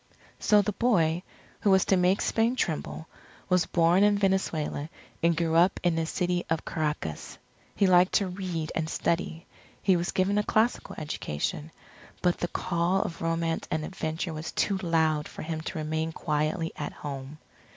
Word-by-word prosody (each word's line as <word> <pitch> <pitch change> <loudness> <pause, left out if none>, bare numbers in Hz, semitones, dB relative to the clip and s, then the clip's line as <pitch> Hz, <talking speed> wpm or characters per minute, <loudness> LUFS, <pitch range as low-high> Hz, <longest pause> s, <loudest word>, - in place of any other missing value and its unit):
So 210 -1 +4
the 210 - -1
boy, 180 -7 +2 0.4
who 205 - +1
was 190 -1 +5
to 195 - +3
make 180 +2 +3
Spain 230 +2 +1
tremble, 160 -5 -2 0.4
was 180 -1 +3
born 170 +3 +4
in 205 0 +4
Venezuela, 180 -6 0 0.3
and 170 0 +3
grew 165 -1 +1
up 175 +4 +4
in 175 -2 +2
the 165 -1 -1
City 180 0 0
of 160 -1 -1
Caracas. 150 - -3 0.4
He 200 - +3
liked 180 0 +5
to 200 - +3
read 180 -4 -4
and 160 -1 -2
study. 165 0 -1 0.3
He 190 - +3
was 175 +1 -1
given 195 +2 +2
a - - +1
classical 220 +3 +1
education. 150 - -3 0.5
But 180 -1 +2
the 175 - 0
call 175 +2 0
of 165 - -6
romance 165 0 -1
and 155 0 -1
adventure 160 -1 -3
was 155 +1 -5
too 195 -2 +1
loud 160 -4 +1
for - - -8
him 160 0 -3
to 160 - -5
remain 160 +1 -2
quietly 155 +2 -1
at - - -4
home. 140 0 -7
170 Hz, 170 wpm, -28 LUFS, 160-190 Hz, 0.5 s, was